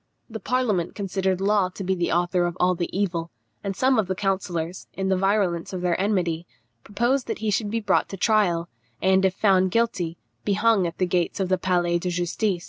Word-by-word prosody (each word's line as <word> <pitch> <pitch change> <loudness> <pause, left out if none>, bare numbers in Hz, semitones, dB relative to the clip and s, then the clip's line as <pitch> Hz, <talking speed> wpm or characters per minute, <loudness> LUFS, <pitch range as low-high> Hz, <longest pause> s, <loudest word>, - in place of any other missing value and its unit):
The 220 - -5
parliament 215 -6 0
considered 190 -2 -1
Law 200 -1 +2
to 190 +2 -7
be 190 +1 +1
the 175 -2 -1
author 175 +1 +1
of 175 +1 -5
all 180 0 +3
the 175 -1 -3
evil, 175 -4 -1 0.3
and 195 -1 -3
some 255 +2 +3
of 205 - 0
the 190 - -1
councillors, 180 -3 -2
in 190 0 -2
the 190 - +3
virulence 190 -3 0
of 185 - -3
their 175 -1 +1
enmity, 175 -5 0 0.4
proposed 240 +6 0
that - - -2
he 215 -1 -1
should 205 +1 0
be 225 +2 -1
brought 210 - +1
to 195 - -6
trial, 180 -5 +2 0.3
and, 190 0 +3
if 190 -1 +1
found 190 -3 +3
guilty, 185 -6 0 0.3
be 205 - +1
hung 210 -3 +3
at 170 - -7
the 185 - +1
gates 175 0 -1
of 190 -2 0
the 185 - +3
Palais 175 -2 +1
de 180 - -3
Justice. 180 +2 -1
190 Hz, 215 wpm, -24 LUFS, 175-205 Hz, 0.4 s, all